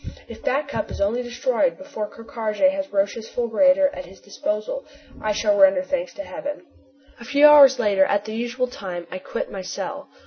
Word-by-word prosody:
If - - -11
Back 280 +2 -1
Cup 305 - -3
is - - -7
only 210 +5 0
destroyed - - 0
before 280 -7 -6
Ker 230 - -13
Karraje 230 +3 0
has 290 0 -5
Roch's 200 +3 -1
fulgurator 275 +4 +3
at 275 - -8
his 190 -1 -15
disposal 210 - -4 0.4
I 215 - 0
shall 305 +9 +1
render 290 -1 +5
thanks 275 -1 -3
to 300 - -6
heaven. 295 +2 -7 0.5
A - - -10
few 285 +4 +4
hours 285 -3 +8
later, 200 -2 +3
at 205 +1 0
the 215 - -6
usual 240 +3 -2
time, 185 -8 -7
I 185 - -5
quit - - -5
my 195 - -5
cell. 275 +9 -6
255 Hz, 195 wpm, -22 LUFS, 210-285 Hz, 0.5 s, hours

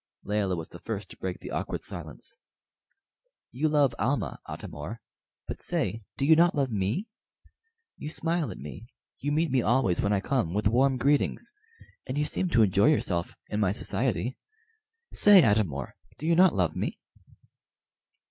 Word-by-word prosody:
Layelah 100 -3 0
was 80 -1 -6
the 85 - -11
first 100 -2 -5
to - - -12
break 95 -1 -4
the - - -7
awkward - - -3
silence. - - -5 1.2
"You 150 +5 0
love 145 -3 +3
Almah, 135 +5 -1
Atam - - -7
or; 75 +11 -6 0.5
but - - -6
say, 115 - -1 0.2
do 135 - +1
you 160 +2 +7
not 170 +1 +4
love 135 -4 0
me? 105 - -1 0.9
You 150 - -5
smile 165 -2 -1
at - - -7
me, 80 +10 -9 0.3
you 145 - -2
meet 155 0 +1
me 130 -1 +3
always 115 -6 +2
when 100 - +1
I 100 - +3
come 100 -6 -1
with 105 0 +2
warm 130 +4 +3
greetings, 145 - +1 0.5
and 130 +2 -3
you 150 - +2
seem 185 +4 -1
to 115 -9 +5
enjoy 100 +3 +4
yourself 85 - 0
in 105 - -2
my 100 -4 +2
society. 115 +1 -1 0.7
Say, 205 -4 +7
Atam 105 - +3
or, 70 -2 -6 0.2
do 155 - -7
you 165 +1 +3
not 185 - +5
love 90 -5 +1
me?" - - -2
120 Hz, 170 wpm, -28 LUFS, 100-145 Hz, 1.2 s, you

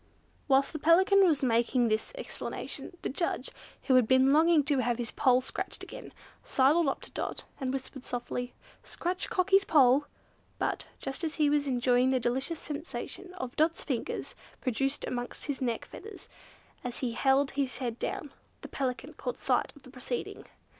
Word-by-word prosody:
Whilst 275 +1 +3
the 310 - -4
Pelican 380 +6 +5
was 295 -5 +2
making 240 0 +3
this 220 0 0
explanation, - - -6
the - - -1
judge, 335 +6 -2 0.3
who 265 - +2
had 255 -3 +5
been 260 +2 +5
longing 320 0 +5
to 280 -1 +1
have 240 -1 +1
his 240 -2 -3
poll 255 -1 +3
scratched 260 - -5
again, - - -9 0.3
sidled 290 +5 +3
up 270 - -1
to - - -9
Dot, - - -4 0.2
and 260 -2 -1
whispered 265 0 -5
softly, 245 0 -4 0.3
"Scratch 360 +2 -3
Cockie's 390 +1 +4
poll!" 280 -4 +5 0.5
But, - - -2
just 270 +5 -5
as 315 -1 -2
he 300 -2 +3
was 290 -1 +2
enjoying 250 0 +3
the 260 -1 +2
delicious 265 +7 -1
sensation 335 +5 -6 0.2
Dot's 320 +2 +1
fingers 255 -6 -3 0.3
produced 270 +3 -1
amongst 245 0 -4
his 285 -2 -3
neck 235 -3 -1
feathers, 420 -1 -11 0.6
as 245 -2 -4
he 250 -3 0
held 270 +3 +2
his 270 -4 -2
head 245 -2 -3
down, 290 - -4 0.3
the - - -9
Pelican 255 -2 -3
caught - - -4
sight - - +1
of 285 - -17
the 255 - -13
proceeding. 270 - -5
270 Hz, 165 wpm, -30 LUFS, 250-310 Hz, 0.6 s, Pelican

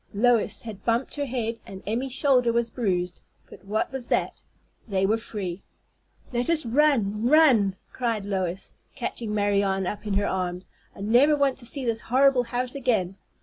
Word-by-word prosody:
Lois 235 +1 +2
had 215 -4 -8
bumped 235 +3 0
her 285 -1 -2
head, 230 -2 -3
and 190 0 -10
Emmy's 245 +5 -2
shoulder 255 -3 +3
was 235 0 0
bruised; 180 -7 -1 0.3
but - - -14
what 215 +4 -1
was 265 -2 -5
that? - - -1 0.5
They 195 -2 +1
were 220 +3 +2
free. 195 -5 -5 0.7
"Let 240 +5 0
us 320 -5 +2
run, 230 -5 +2
run!" 250 -10 +5 0.2
cried 230 -5 -1
Lois, 190 -2 -3 0.2
catching 225 -3 -3
Marianne 200 -2 +1
up 210 +3 -5
in 200 - -1
her 200 +1 +1
arms. 180 -1 -3 0.2
"I - - -10
never 245 +9 +4
want 280 -2 +1
to 240 - -6
see 270 +1 -4
this 230 -1 -1
horrible 260 0 +3
house 245 +2 -2
again." 220 -9 0
230 Hz, 170 wpm, -25 LUFS, 200-255 Hz, 0.7 s, run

